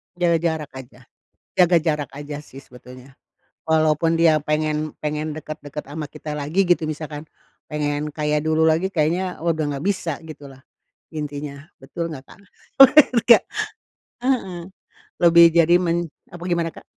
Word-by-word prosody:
Jaga 175 -1 +2
jarak 160 -3 -2
aja 130 - -14 0.6
jaga 180 -1 +5
jarak 150 -3 -1
aja 145 0 -6
sih 135 -2 -13
sebetulnya, 125 +1 -15 0.6
walaupun 160 0 +2
dia 165 -2 +4
pengen 150 0 -2
pengen 150 0 -3
deket-deket 150 -2 -7
ama 155 +1 -5
kita 155 +1 -8
lagi 155 +7 0
gitu 175 -2 +3
misalkan, 155 0 -6 0.4
pengen 150 0 -3
kayak 150 0 -1
dulu 160 0 +2
lagi 165 +4 +1
kayaknya, 175 +3 -1
wah, 170 - +2
udah 160 -1 -2
nggak 140 - -6
bisa 185 -6 -2
gitu 155 -2 -11
lah, 135 -1 -15 0.5
intinya, 145 -2 -6 0.2
betul 165 +5 -5
nggak, 135 -3 -9
Kak? - - -16 0.4
Bener 270 +2 +9 0.2
nggak? 235 0 +6 0.8
Heeh, 240 -8 -1 0.6
lebih 170 0 +7
jadi 170 +1 +4
men 170 -1 0 0.2
apa, 175 -1 -10
gimana, 170 -2 0
Kak? - - -14
155 Hz, 150 wpm, -22 LUFS, 150-170 Hz, 0.8 s, Bener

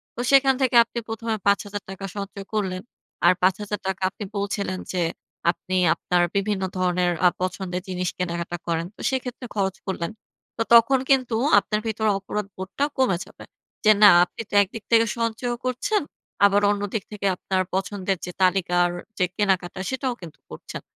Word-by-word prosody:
তো - - -9
সেখান 270 -1 +6
থেকে 255 -2 +2
আপনি 235 +1 -6
১ম 225 +1 -6
এ - - -5
৳৫,০০০ 200 -1 -1
সঞ্চয় 200 0 -6
করলেন। 190 -4 -1 0.4
আর - - +7
৳৫,০০০ 190 0 -1
আপনি 205 - -8
বলছিলেন 200 -2 -2
যে 180 - -1 0.5
আপনি 185 +1 -6 0.2
আপনার 180 -1 0
বিভিন্ন 200 -1 0
ধরনের 180 -1 +1
আ - - +8
পছন্দের 185 0 -3
জিনিস 180 -1 -2
কেনাকাটা 170 -1 -3
করেন। 165 0 0
তো - - -12
সেক্ষেত্রে 255 -1 -4
খরচ 195 -2 0
করলেন। 180 -2 -2 0.5
তো - - -2
তখন 235 +3 +7
কিন্তু 255 -4 +3 0.2
আপনার 210 - -2
ভেতরে 220 0 0
অপরাধবোধটা 195 +5 -3
কমে 255 -9 +2
যাবে। - - -14 0.4
যে, 215 - +8
না, 205 - +11 0.2
আপনি 180 - -9
তো - - -15
একদিক 205 +3 -9
থেকে 230 0 +6
সঞ্চয়ও 230 +1 -2
করছেন, 255 - 0 0.4
আবার 200 0 +4
অন্য 205 0 0
দিক 220 -4 -1
থেকে 210 -1 -5
আপনার 185 +1 -1
পছন্দের 190 0 -1
যে 180 - -6
তালিকার 180 -1 +3 0.3
যে 185 - +3
কেনাকাটা, 190 -3 0
সেটাও 260 -1 -2
কিন্তু 165 -3 -11
করছেন। - - -8
200 Hz, 160 wpm, -24 LUFS, 185-225 Hz, 0.5 s, না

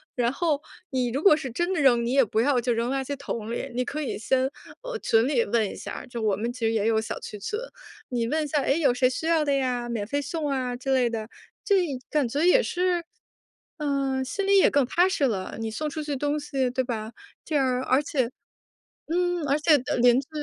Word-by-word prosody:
然 240 -1 +1
后 305 -2 0 0.3
你 255 -2 0
如 275 +5 -2
果 350 -7 +7
是 275 -4 -5
真 345 +10 -1
的 360 - -1
扔， 240 -4 +4
你 240 - -1
也 270 0 +5
不 220 +1 0
要 260 0 +3
就 240 0 0
扔 235 +2 -1
垃 270 0 -1
圾 285 +2 -4
桶 230 -5 -5
里， 255 +2 -4
你 250 +1 -1
可 305 +4 -4
以 280 - -3
先， 260 +4 +1 0.3
呃， - - -4
群 225 0 +3
里 265 -5 +2
问 220 -1 +1
一 - - -7
下， - - -7
就 235 -2 -6
我 210 -3 +2
们 230 +4 -2
其 250 - -11
实 225 - +1
也 215 -1 +1
有 220 -1 +3
小 220 - -4
区 210 - -8
群， 420 - -3 0.5
你 235 -2 -1
问 310 +5 0
一 300 - -3
下， 290 0 +1
诶， 275 +4 +1
有 280 - +4
谁 250 +1 +3
需 315 +5 -3
要 325 -2 +3
的 285 - +1
呀， 250 -3 0
免 230 -4 -3
费 285 +7 -1
送 310 -1 -3
啊 255 -2 -1
之 265 +2 -1
类 250 -2 +3
的。 225 -1 -4 0.3
这 405 - +3 0.3
感 295 -4 +1
觉 280 +6 -2
也 360 +8 +6
是， 360 -3 0 0.8
嗯， 275 -3 -1
心 390 +10 -3
里 400 0 +5
也 - - +6
更 285 -3 +3
踏 350 +8 +3
实 375 -7 -1
了， 200 -7 -2
你 225 -1 -3
送 300 +8 -3
出 310 0 -5
去 295 -1 -3
东 290 +2 -1
西 275 -3 -1
对 255 +1 -1
吧？ 225 -2 -4 0.3
这 315 - -3
样 260 -3 +2
而 260 +2 +3
且 260 -5 0 0.8
嗯， 355 -1 +1
而 285 +2 +3
且 305 0 +5
的 255 - -2
邻 245 0 +5
居 275 - -13
265 Hz, 260 characters per minute, -26 LUFS, 240-300 Hz, 0.8 s, 果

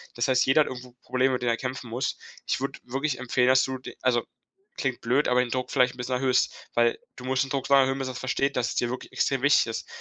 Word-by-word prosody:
Das 120 - 0
heißt, 130 -1 +3
jeder 135 +4 +5
hat - - +1
irgendwo 125 -1 -8
Probleme, 130 +1 +1
mit 125 - -1
denen 120 -1 +1
er 115 - 0
kämpfen 130 0 -5
muss. 120 +4 -2 0.3
Ich - - 0
würde - - -4
wirklich 135 +4 -2
empfehlen, 125 0 +1
dass 130 0 +5
du 130 0 -3
d 130 - -10
also 120 -2 +2 0.5
klingt 130 -3 -2
blöd, 125 +5 +1
aber 125 0 +3
den 125 -1 0
Druck 130 -1 -2
vielleicht 125 -2 +3
'n - - -19
bisschen 125 +1 -2
erhöhst, 130 0 +2 0.2
weil 120 0 +2 0.2
du 125 - -11
musst 130 +1 +1
den - - -10
Druck 135 -1 -2
so 140 - +2
lange 135 -1 +7
erhöhen 135 +1 -1
bis 135 -1 -3
er - - -5
versteht, 135 +2 -1
dass 120 -2 +1
es - - -5
dir 120 - 0
wirklich 125 +1 -6
extrem 135 -2 0
wichtig 145 -3 +4
ist. 115 - -5
130 Hz, 275 wpm, -26 LUFS, 125-135 Hz, 0.5 s, lange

